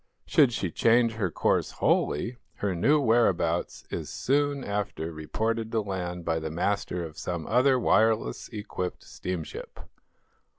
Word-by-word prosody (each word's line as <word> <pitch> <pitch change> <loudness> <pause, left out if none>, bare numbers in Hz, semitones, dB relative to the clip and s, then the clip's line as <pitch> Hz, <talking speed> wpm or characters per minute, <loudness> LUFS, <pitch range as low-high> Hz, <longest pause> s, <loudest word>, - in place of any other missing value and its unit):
Should 140 -5 +4
she 95 -7 -2
change 115 +3 +4
her 110 -5 -1
course - - +1
wholly, 115 +12 +1 0.2
her 100 -2 -1
new 140 - +3
whereabouts 110 - +2
is - - -4
soon 145 0 0
after 100 -6 -3
reported 110 +8 -2
to 110 - +2
land 90 -4 -4
by 80 -1 +1
the 80 0 -4
master 90 +1 -1
of 80 -1 -9
some 85 -3 -3
other 130 +3 +4
wireless 110 - +2
equipped 105 -4 -5
steamship. 90 -4 -6
100 Hz, 135 wpm, -27 LUFS, 85-115 Hz, 0.2 s, Should